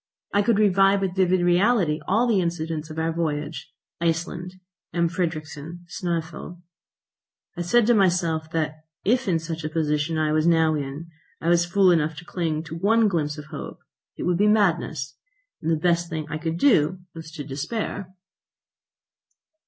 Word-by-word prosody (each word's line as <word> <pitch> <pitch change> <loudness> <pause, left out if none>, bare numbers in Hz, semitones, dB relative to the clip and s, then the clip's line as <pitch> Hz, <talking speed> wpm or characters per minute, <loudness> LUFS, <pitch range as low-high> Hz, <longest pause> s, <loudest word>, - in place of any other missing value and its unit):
I 205 - +4
could 225 0 +2
revive 195 -1 +4
with 185 -2 -1
vivid 185 -1 +3
reality 175 -2 +3
all 220 +6 +3
the 220 -6 +2
incidents 160 -2 -3
of 155 - -8
our 160 0 0
voyage, 150 -3 -3 0.3
Iceland, 170 +2 -2 0.4
M. 170 -1 +3
Fridrikssen, 165 -1 -4
Snæfell. 170 0 -4 1.0
I 175 - -4
said 220 +7 +3
to 240 - +4
myself 170 -6 +2
that 155 -1 -2 0.2
if, 245 +4 +2
in 175 -3 +3
such 165 0 -5
a 155 - -2
position 155 0 0
as - - +1
I - - 0
was 155 +1 +2
now 160 -2 +4
in, 145 +3 -5 0.3
I 165 - -1
was 175 0 +4
fool 190 +1 +4
enough 160 -2 +1
to 165 +3 -10
cling 160 -4 -2
to 160 0 -8
one 215 +6 +3
glimpse 155 -5 -1
of 150 - -8
hope, 145 - -7 0.4
it - - -4
would 175 0 +1
be 210 - +4
madness, 170 -9 +1 0.4
and 160 - -2
that 165 - +3
the 155 - -6
best 170 0 +1
thing 155 -1 -3
I 155 - -3
could 165 +1 -2
do 185 - +3
was 160 -1 -9
to 150 -3 -6
despair. 185 - -4
170 Hz, 175 wpm, -24 LUFS, 155-185 Hz, 1.0 s, I